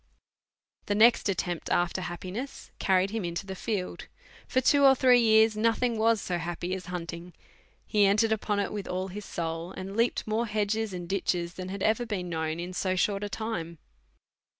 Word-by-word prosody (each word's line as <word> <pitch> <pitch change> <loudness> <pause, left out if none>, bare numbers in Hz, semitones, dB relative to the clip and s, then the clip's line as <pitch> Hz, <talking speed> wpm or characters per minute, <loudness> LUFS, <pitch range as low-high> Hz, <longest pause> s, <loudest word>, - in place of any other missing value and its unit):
The 205 - +1
next 230 0 +5
attempt 180 -3 -2
after 175 +1 +1
happiness 185 +9 -6
carried 190 0 +2
him 220 -2 -2
into 170 +2 -3
the 190 - -5
field; 190 -1 -4 0.4
for 260 - +2
two 280 +2 +4
or 270 -1 +8
three 250 -1 +5
years 220 -1 +5
nothing 230 +2 +1
was 225 0 +3
so 180 -3 -2
happy 175 +2 -4
as 190 -1 -5
hunting; 175 0 -6 0.5
he 205 -2 +3
entered 215 +3 +3
upon 210 -1 0
it 200 - -2
with 205 -2 -4
all 185 +1 -3
his 205 +2 -7
sou!, 165 0 -4
and 190 +1 -7
leaped 230 +2 +1
more 220 +2 0
hedges 215 0 -1
and 175 -2 -6
ditches 175 -2 -1
than 185 0 -6
had 195 0 -4
ever 225 +2 +1
been 185 -5 -3
known 160 -1 -2
in 175 +1 -5
so 185 0 0
short 200 +2 0
a 205 - -3
time. 180 -7 -4
195 Hz, 185 wpm, -28 LUFS, 180-220 Hz, 0.5 s, or